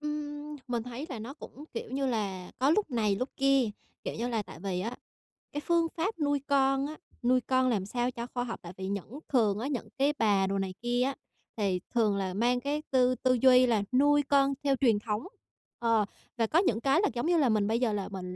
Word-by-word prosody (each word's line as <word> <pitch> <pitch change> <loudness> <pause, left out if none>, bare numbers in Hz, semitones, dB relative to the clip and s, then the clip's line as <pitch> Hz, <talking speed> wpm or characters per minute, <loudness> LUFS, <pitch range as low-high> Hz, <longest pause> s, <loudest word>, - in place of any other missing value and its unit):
Ừm, 300 0 -5
mình 240 -2 -1
thấy 250 +5 -6
là 250 - -5
nó 240 +6 -7
cũng, 295 0 -11
kiểu 230 - -5
như 270 +1 -1
là, 195 -7 -2
có 270 +3 +3
lúc 400 -2 +2
này 215 -5 +1
lúc 255 +4 -2
kia, 275 -4 +3 0.3
kiểu - - -3
như 235 +2 -2
là, 225 -3 -1
tại 160 - -12
vì 185 -1 -2
á 230 +5 -4 0.6
cái 290 - -3
phương 335 0 +2
pháp 350 +3 -2
nuôi 290 -1 +1
con 270 -1 +3
á, 310 - -7 0.3
nuôi 255 +1 +4
con 255 +1 +2
làm 205 -6 0
sao 245 +4 -1
cho 240 -1 -6
khoa 245 -1 -1
học, 230 - -5
tại 175 +1 -8
vì 190 0 -4
những 200 +7 -5
thường 215 -6 +2
á 255 - -2
những 245 -6 -3
cái 280 +2 +3
bà 200 -3 +3
đồ 195 +1 -1
này 190 -1 -2
kia 240 +1 0
á 270 +2 +1 0.4
thì 195 -4 +1
thường 215 -4 +3
là 190 -2 -2
mang 240 +4 +2
cái 290 +3 -2
tư 255 -1 +4
tư 255 0 +2
duy 255 -1 +7
là 220 -4 +2
nuôi 290 +3 +4
con 275 0 +3
theo 275 -1 +3
truyền 235 -6 +3
thống. 215 - -3 0.5
Ờ, 230 -3 +3 0.3
và 225 - +2
có 320 +9 +3
những 235 - +1
cái 275 +5 +3
là, 415 - +3
giống 240 - -2
như 345 0 +3
là, 275 -6 +3
mình 210 -2 +2
bây 225 +2 +1
giờ 235 -4 +1
là 200 -1 -3
mình 180 -2 -6
245 Hz, 240 wpm, -29 LUFS, 215-275 Hz, 0.6 s, duy